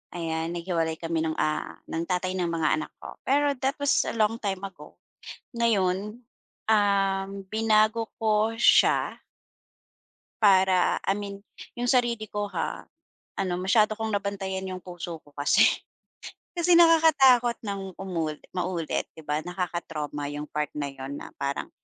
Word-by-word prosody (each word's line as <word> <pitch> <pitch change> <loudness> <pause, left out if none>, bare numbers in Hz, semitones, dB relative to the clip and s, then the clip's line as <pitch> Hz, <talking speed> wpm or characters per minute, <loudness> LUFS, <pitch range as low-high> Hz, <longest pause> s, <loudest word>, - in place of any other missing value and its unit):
ayan, 160 -1 -2
naghiwalay 170 -2 -1
kami 165 -1 -1
ng, 160 - -1
ah, 155 - -2
ng 165 +1 -2
tatay 185 +1 -1
ng 175 -2 0
mga 160 -2 +1
anak - - -6
ko. - - -9
Pero 285 0 +2
that 270 +1 +1
was 285 - +2
a - - -3
long 225 0 +1
time 195 -4 -3
ago. 195 -1 -9 0.7
Ngayon, 210 0 0 0.5
uhm, 195 -2 +2 0.2
binago 220 +1 +2
ko 220 0 +1
siya - - +4 1.2
para, 190 -2 +4
I 195 - +2
mean 200 0 -7 0.3
yung 245 0 -2
sarili 240 -3 +2
ko 205 0 -2
ha, 165 - -3 0.5
ano, 190 -2 -1
masyado 210 +3 +3
kong 220 -2 -1
nabantayan 195 -1 -3
yung 185 - -5
puso 175 -2 -7
ko 145 - -20
kasi. 145 0 +4 0.9
Kasi 345 0 +3
nakakatakot 275 -8 +5
nang 195 -2 -5
umuli 165 -5 -3 0.2
maulit, 180 -3 -2
'di 160 - -12
ba? 150 +1 0
Nakaka-trauma 165 -5 -4
yung 150 +1 -5
part 150 -1 -2
na 145 -2 -3
'yon 135 +1 -7
na - - -9
parang 140 0 -3
195 Hz, 145 wpm, -26 LUFS, 165-220 Hz, 1.2 s, nakakatakot